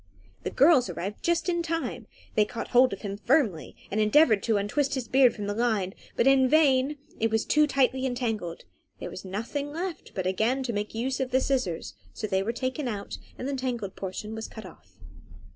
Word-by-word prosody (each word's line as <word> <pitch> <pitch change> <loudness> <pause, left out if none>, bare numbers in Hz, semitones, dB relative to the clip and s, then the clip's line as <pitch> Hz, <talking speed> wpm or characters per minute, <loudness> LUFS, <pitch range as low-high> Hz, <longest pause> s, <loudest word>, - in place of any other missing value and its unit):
The - - -3
girls 270 - +5
arrived 185 +4 -5
just 340 +1 +1
in 345 -1 +1
time. 330 -1 -3 0.3
They 215 - +4
caught 225 +2 -5
hold 250 +1 +5
of 195 - -6
him 200 -1 -4
firmly, 220 - +1 0.2
and 215 +2 +1
endeavoured 215 -1 +5
to 220 0 +1
untwist 275 +8 0
his 255 -3 -3
beard 260 -1 +5
from 205 - -5
the 205 - -2
line, 215 -4 0 0.2
but - - +2
in 270 -1 +5
vain; 290 -1 +3 0.2
it 225 - +2
was 220 0 0
too 300 0 +4
tightly 265 -1 +2
entangled. 225 -9 -3 0.4
There - - -6
was - - -8
nothing 230 +10 -4
left 345 +3 -5
but 185 -2 -2
again 220 +8 +1
to 240 -2 -2
make 210 +1 -3
use 255 +4 -1
of 260 -1 -1
the 260 +1 +3
scissors; 255 -12 -1 0.2
so - - -4
they 190 -2 +1
were 210 +4 -1
taken 260 +3 -3
out, 205 -4 -5 0.2
and 255 - -4
the 280 - -2
tangled 240 -7 -3
portion 200 +3 -5
was 220 0 -5
cut 220 -3 -10
off. 95 - -15
240 Hz, 205 wpm, -27 LUFS, 205-270 Hz, 0.4 s, girls